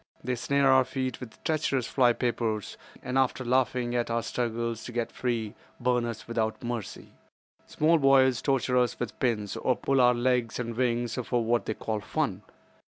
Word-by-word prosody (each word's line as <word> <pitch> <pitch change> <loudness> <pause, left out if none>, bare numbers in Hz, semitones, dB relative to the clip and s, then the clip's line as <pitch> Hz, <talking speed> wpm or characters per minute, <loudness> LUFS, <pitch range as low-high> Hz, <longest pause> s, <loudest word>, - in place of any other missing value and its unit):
They 125 - -1
snare 135 +4 +1
our 130 0 +6
feet 130 -1 -3
with 115 -4 -11
treacherous 145 -5 0
fly 125 -3 +3
papers, 115 -4 -2 0.3
and 130 +1 0
after 130 -1 0
laughing 125 -1 +1
at 120 -1 0
our 115 0 0
struggles 115 -1 -2
to - - -6
get 120 -1 -2
free, 115 -4 -2 0.3
burn 125 -1 +1
us 115 -2 -6
without 115 +1 -2
mercy. 120 -4 -5 0.6
Small 160 +2 +3
boys 130 -2 +4
torture 130 -2 +1
us 125 -1 0
with 120 - -5
pins, 110 -5 0
or 130 - +1
pull 135 +1 +1
off 125 0 +5
legs 120 -1 0
and 115 -2 -4
wings 120 0 0
for 120 -1 0
what 120 +1 +1
they 110 - -1
call 110 -1 -3
'fun. 105 - -2
120 Hz, 175 wpm, -28 LUFS, 115-130 Hz, 0.6 s, our